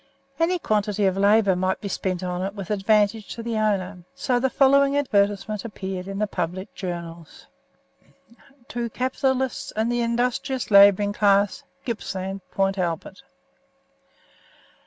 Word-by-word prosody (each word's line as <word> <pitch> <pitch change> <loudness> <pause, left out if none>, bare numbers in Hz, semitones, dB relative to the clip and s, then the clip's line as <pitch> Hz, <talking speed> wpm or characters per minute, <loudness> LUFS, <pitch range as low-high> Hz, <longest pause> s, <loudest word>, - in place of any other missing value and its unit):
Any 345 +2 +2
quantity 210 - 0
of 190 -1 +2
labour 200 0 +4
might 185 +1 -1
be 205 - -5
spent 185 -2 -3
on 180 0 -3
it 195 +2 -4
with 195 -1 -6
advantage 210 +1 +2
to 230 - -7
the 230 -1 -2
owner, 200 -3 -1 0.2
so 255 -3 0
the 265 +2 +1
following 275 +1 +4
advertisement 205 -5 0
appeared 190 -4 -6
in 195 0 -5
the 210 - +1
public 185 0 -4
journals: 170 -3 -7 1.2
TO 235 -1 -3
CAPITALISTS 260 +1 -1
AND 220 +2 0
THE 240 0 0
INDUSTRIOUS 245 +1 -1
LABOURING 200 0 +6
CLASS. 200 -1 +2 0.2
GIPPSLAND 195 -4 -4
PORT 195 0 0
ALBERT. 170 -3 -3
205 Hz, 135 wpm, -24 LUFS, 190-235 Hz, 1.2 s, LABOURING